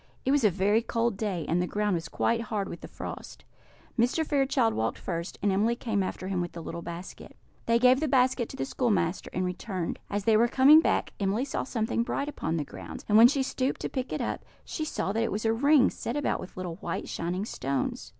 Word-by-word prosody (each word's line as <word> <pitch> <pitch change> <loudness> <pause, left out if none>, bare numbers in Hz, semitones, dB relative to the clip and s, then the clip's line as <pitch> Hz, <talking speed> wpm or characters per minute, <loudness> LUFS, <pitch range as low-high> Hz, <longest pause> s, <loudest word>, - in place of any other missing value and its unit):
It 265 - +2
was 285 -2 +3
a 210 - +6
very 200 +4 +2
cold 230 -1 0
day, 190 -6 -2
and 170 +3 +1
the 180 - -1
ground 210 0 0
was 165 -1 -3
quite 230 0 0
hard 210 -3 -2
with 170 - -8
the - - -8
frost. - - -8 0.6
Mr. 250 +7 +2
Fairchild 270 -5 +2
walked 110 0 -1
first, 170 0 -5
and 205 - +3
Emily 215 +5 +2
came 220 -4 -1
after 185 0 -4
him 185 -2 -1
with 175 - -4
the 170 - -7
little 170 +2 -6
basket. 170 +2 -8 0.3
They 230 0 +4
gave 250 +2 +5
the 310 - 0
basket 255 -3 +2
to - - -9
the 135 - -1
schoolmaster, 190 - 0
and 185 +1 -1
returned. 180 -1 -4
As 205 0 -2
they 220 +1 +4
were 235 +2 +4
coming 275 +5 +7
back, - - 0
Emily 205 +6 0
saw 280 - -2
something 230 -2 -1
bright 280 +4 -2
upon 165 - -2
the 150 - -2
ground; - - -9
and 210 - +2
when 225 +2 +10
she 275 +1 +1
stooped 260 0 -1
to - - -2
pick 260 -1 -4
it - - -2
up, - - -3 0.2
she 310 - -3
saw 195 - -2
that 225 +2 0
it 230 - 0
was 210 +3 -3
a 225 - +3
ring 280 +3 +4
set - - -4
round - - 0
with 185 - -10
little 180 -2 -5
white 170 - -4
shining 180 +4 -3
stones. 135 - -3
215 Hz, 235 wpm, -28 LUFS, 180-250 Hz, 0.6 s, when